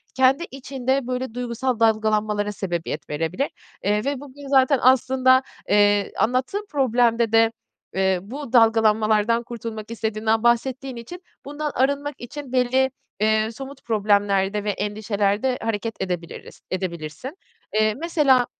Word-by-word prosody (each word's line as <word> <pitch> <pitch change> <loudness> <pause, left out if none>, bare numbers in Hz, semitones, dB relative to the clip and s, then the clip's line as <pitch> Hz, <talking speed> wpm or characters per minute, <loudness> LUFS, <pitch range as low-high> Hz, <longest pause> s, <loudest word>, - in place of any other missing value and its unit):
kendi 265 +5 +4
içinde, 265 -1 -2
böyle, 255 -2 -3
duygusal 245 0 -2
dalgalanmalara 215 -2 +1
sebebiyet 170 -6 -4
verebilir. 165 - -2 0.3
Eee, 210 +2 +1
ve 280 -1 -1
bugün 285 0 -11
zaten 270 0 +4
aslında, 260 0 +4 0.3
eee, 205 0 +3
anlattığın 260 - 0
problemde 240 -4 +2
de, 225 0 +5 0.4
eee, 190 -1 +1
bu 260 +5 -8
dalgalanmalardan 225 0 +4
kurtulmak 225 -2 -7
istediğinden 220 0 -1
bahsettiğin 255 +2 +1
için 295 +11 -9 0.2
bundan 295 +1 -4
arınmak 280 +2 0
için 270 +2 -8
belli, 260 +1 +2 0.3
eee, 215 +1 +2
somut 270 +3 -10
problemlerde 205 -2 +1
ve 210 - -2
endişelerde 210 +4 -1
hareket 225 0 -3
edebiliriz, 175 -3 -5
edebilirsin. 180 - -5 0.4
Eee, 215 0 +3
mesela, 290 -6 +3
230 Hz, 120 wpm, -23 LUFS, 210-260 Hz, 0.4 s, de